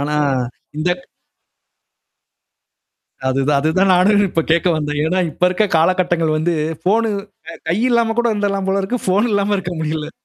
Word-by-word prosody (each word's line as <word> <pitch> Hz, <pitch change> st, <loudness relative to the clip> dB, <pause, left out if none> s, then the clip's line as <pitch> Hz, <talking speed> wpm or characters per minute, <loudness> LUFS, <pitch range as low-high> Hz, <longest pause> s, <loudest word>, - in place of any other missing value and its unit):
ஆனா, 150 Hz, +1 st, -1 dB, 0.6 s
இந்தட் 180 Hz, +3 st, -1 dB, 2.3 s
அதுதான் 135 Hz, +2 st, +1 dB
அதுதான் 185 Hz, +6 st, +2 dB
நானு 180 Hz, +4 st, +4 dB, 0.2 s
இப்ப 165 Hz, -1 st, 0 dB
கேட்க 170 Hz, +2 st, +3 dB
வந்தேன். 150 Hz, -1 st, -2 dB
ஏன்னா 180 Hz, +3 st, 0 dB
இப்ப 155 Hz, -, -18 dB
இருக்க 185 Hz, +4 st, +1 dB
காலகட்டங்கள் 170 Hz, -1 st, +1 dB
வந்து 165 Hz, +2 st, 0 dB, 0.3 s
ஃபோனு 220 Hz, +5 st, +2 dB, 0.4 s
அ -, -, -8 dB
க -, -, -23 dB
கை 180 Hz, -, +1 dB
இல்லாம 230 Hz, -2 st, +2 dB
கூட 240 Hz, -, +2 dB
இருந்துறலாம் 200 Hz, -2 st, -1 dB
போல 195 Hz, +1 st, +1 dB
இருக்கு. 240 Hz, +6 st, -2 dB
ஃபோன் 205 Hz, +6 st, +2 dB
இல்லாம 205 Hz, 0 st, +1 dB
இருக்க 180 Hz, -2 st, -4 dB
முடியல. 155 Hz, 0 st, -3 dB
180 Hz, 150 wpm, -18 LUFS, 160-200 Hz, 2.3 s, நானு